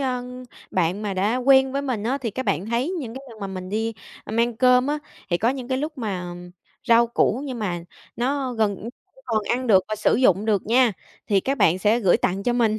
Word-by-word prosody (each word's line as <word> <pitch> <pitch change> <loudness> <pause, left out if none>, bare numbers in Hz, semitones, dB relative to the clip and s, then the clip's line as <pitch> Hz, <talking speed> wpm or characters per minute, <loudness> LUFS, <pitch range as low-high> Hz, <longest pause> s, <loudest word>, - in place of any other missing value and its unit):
ờ, 255 -2 -1 0.5
bạn 185 +3 0
mà 205 -2 -2
đã 205 +6 +1
quen 265 +1 +4
với 280 0 -1
mình 250 -7 -2
á, 265 +4 0
thì 235 -5 -3
các 260 +5 -4
bạn 175 +7 -1
thấy 235 +7 0
những 280 -12 -5
cái 265 - -8
lần 220 - -13
mà 195 - -3
mình 185 -1 -6
đi, 225 +2 -1 0.3
a, - - -8
mang 235 0 +1
cơm 250 +1 +4
á, 300 +1 0 0.3
thì 175 - +2
có 225 - +2
những 260 -1 -3
cái 260 0 0
lúc 300 0 -4
mà 180 -6 -4 0.5
rau 235 0 +6
củ 235 +1 +1
nhưng 255 -4 -5
mà 175 -5 -3 0.3
nó 260 +1 -1
gần, 215 -4 0
ưm, 195 - -11 0.3
như 265 - -20
còn 220 -3 0
ăn 250 +1 0
được 190 -4 +5
và 215 - -1
sử 215 - +2
dụng 205 -5 +3
được 210 -4 0
nha, 240 -1 +4 0.3
thì 200 -2 +3
các 270 +7 -2
bạn 170 +3 +4
sẽ 215 +5 +2
gửi 190 -5 +4
tặng 190 +2 -1
cho 245 - +1
mình, 225 -3 +2
230 Hz, 245 wpm, -23 LUFS, 200-255 Hz, 0.5 s, rau